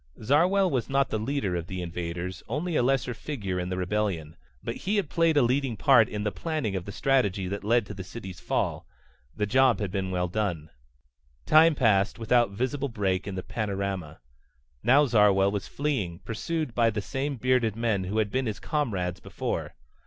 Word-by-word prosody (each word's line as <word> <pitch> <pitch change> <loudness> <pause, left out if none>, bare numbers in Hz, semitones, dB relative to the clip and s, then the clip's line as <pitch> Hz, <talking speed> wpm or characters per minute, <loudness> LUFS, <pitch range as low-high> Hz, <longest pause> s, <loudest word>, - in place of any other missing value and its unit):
Zarwell 180 - +3
was 125 -4 -1
not 135 0 +2
the 110 - -1
leader 110 -5 -1
of 85 -1 -3
the 95 0 -5
invaders, 85 +1 -4
only 155 +8 -2
a - - +3
lesser 125 0 +1
figure 105 -8 -4
in 90 0 -3
the 90 - -3
rebellion. 90 -4 -2 0.3
But - - -4
he 200 +3 -1
had 195 -8 -1
played 165 -2 +3
a 145 - +6
leading 125 -1 0
part - - +5
in 105 -1 -4
the 105 - 0
planning 155 -11 -2
of 90 -2 -3
the 100 - -6
strategy 105 -7 +1
that 100 +2 -4
led 115 +1 +2
to 100 - -7
the 95 -1 -7
city's 95 -3 -9
fall. - - -2 0.5
The 105 - 0
job 130 +3 +4
had 100 -4 -3
been 95 -1 -2
well 90 -1 0
done. 90 -5 -2 0.7
Time 155 +1 +6
passed, 105 -6 +2
without 120 0 +3
visible 130 +7 -2
break 100 -4 -1
in 100 - -4
the 95 - -4
panorama. 100 -6 -3 0.6
Now 140 +4 +5
Zarwell 105 -5 +4
was 100 -1 -3
fleeing, 120 - -2
pursued 155 +4 -3
by 115 -1 +3
the 110 -1 -2
same 140 +4 -3
bearded 125 -3 +1
men 110 -5 0
who 100 +4 -3
had 105 -2 +1
been 130 -1 0
his 105 - -3
comrades 95 - -2
before. - - -4
110 Hz, 190 wpm, -27 LUFS, 95-135 Hz, 0.7 s, a